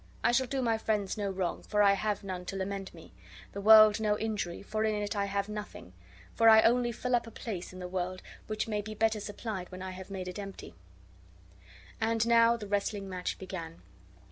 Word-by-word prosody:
I - - +4
shall 260 +1 +2
do 265 0 -2
my 225 -2 +1
friends 210 -3 -1
no 205 -2 -2
wrong, 185 -3 -2
for 210 -1 +1
I 200 -1 +6
have 210 +1 -2
none 185 -2 -5
to 195 - -5
lament 195 0 -4
me; 85 0 -15 0.4
the 200 - -6
world 215 0 +8
no 210 -1 +1
injury, 210 -6 -3
for 215 +2 -2
in 215 -1 +1
it 210 0 -2
I 200 -1 0
have 200 0 -2
nothing; 210 - -8 0.4
for 225 0 +5
I 220 0 +8
only 240 +1 +3
fill 250 +2 -1
up 240 - -1
a - - -6
place 210 -5 -6
in 185 - -11
the 180 -1 -6
world 185 0 -4 0.2
which 215 0 -2
may 210 -2 -1
be 215 +1 -7
better 220 0 +1
supplied 205 -2 -6
when 185 0 -7
I 190 - -5
have 185 +1 -9
made 190 -2 -5
it 180 +2 -6
empty." 195 - -8 1.3
And 225 0 +1
now 235 0 +5
the 215 - -7
wrestling 200 0 -2
match 180 -1 -3
began. 170 -4 -8
205 Hz, 215 wpm, -30 LUFS, 190-220 Hz, 1.3 s, world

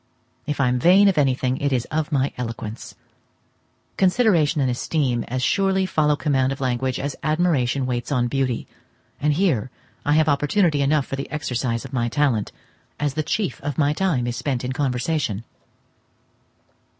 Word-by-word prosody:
If 150 -1 -2
I 135 - +3
am 125 0 0
vain 190 +8 +6
of 185 - +1
anything, 130 -2 +1
it 140 0 -1
is 125 -3 0
of 155 0 -1
my 140 -1 +1
eloquence. 115 -2 -6 1.0
Consideration 180 -6 +3
and 130 -2 +2
esteem 125 -2 -1
as 130 +1 -3
surely 190 +2 +2
follow 155 -4 +2
command 135 -3 +1
of 135 - -4
language 130 -1 -1
as 140 0 -3
admiration 155 -5 +1
waits 120 0 -3
on 125 -3 +1
beauty, 130 -2 -1 0.6
and 150 +1 +2
here 145 - +1 0.3
I 145 - +2
have 155 0 +3
opportunity 150 +2 +2
enough 140 0 +2
for 135 - -5
the 135 - -5
exercise 125 -5 -2
of 135 - -10
my 120 -2 0
talent, 125 -6 0 0.5
as 145 -2 0
the 155 - -1
chief 160 - -2
of 145 -2 -4
my 145 -1 +2
time 155 -8 0
is 120 0 -2
spent 130 -1 -2
in 130 - -2
conversation. 130 - -1
140 Hz, 165 wpm, -22 LUFS, 125-155 Hz, 1.0 s, vain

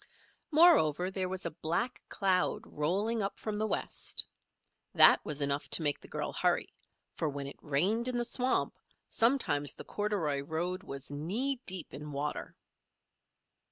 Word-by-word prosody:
Moreover 240 - +4
there 185 -1 -3
was 185 -1 -5
a 170 - -2
black 170 +10 -3
cloud 190 -2 0
rolling 200 +10 -1
up 195 0 -3
from 210 -1 -4
the 215 - 0
west. - - -2 0.7
That - - +7
was 150 -1 -1
enough 140 +1 -2
to 165 - +3
make 145 -1 +1
the - - -14
girl - - -4
hurry, - - 0 0.4
for 155 - -2
when 140 -1 -5
it 140 - -9
rained 190 - 0
in 250 -1 -1
the 240 - 0
swamp, 250 +2 -1 0.3
sometimes 225 - +5
the - - -9
corduroy 190 -10 -1
road 175 +6 -3
was 140 -8 -8
knee 225 - -1
deep 185 -4 -1
in 150 +1 -8
water. 145 +1 -4
180 Hz, 155 wpm, -31 LUFS, 150-220 Hz, 0.7 s, That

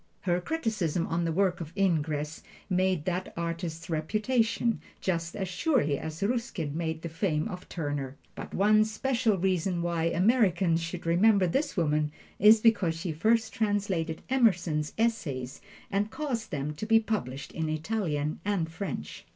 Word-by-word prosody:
Her 180 -1 +1
criticism 205 - -1
on 170 +1 -1
the 165 - 0
work 180 0 +1
of 160 -1 -7
Ingres 155 -5 0 0.3
made 185 -3 +1
that 185 0 -2
artist's 165 -1 -4
reputation, 220 +8 0 0.2
just 165 -3 -2
as 195 -2 -2
surely 185 - +1
as 160 +3 -5
Ruskin 200 - -2
made 160 -1 -3
the - - -2
fame 160 -1 -1
of 180 -4 -8
Turner. 145 -5 -3 0.2
But - - -8
one 215 +2 +4
special 230 0 0
reason 180 -1 0
why 170 -1 0
Americans 180 -2 +3
should 165 +1 -5
remember 190 +4 +4
this 270 - -1
woman 150 -2 +1 0.3
is 215 +2 +7
because 205 -8 +3
she 165 +1 -3
first 220 +8 +2
translated 195 -7 -1
Emerson's 180 - +2
"Essays" 155 - -1 0.3
and 205 +2 +1
caused 245 -6 -3
them 145 +1 -3
to 215 - -4
be 225 0 +6
published 140 - -3
in 160 -1 -2
Italian 155 -3 -1
and 190 -5 -1
French. 165 - -6
180 Hz, 150 wpm, -29 LUFS, 160-215 Hz, 0.3 s, is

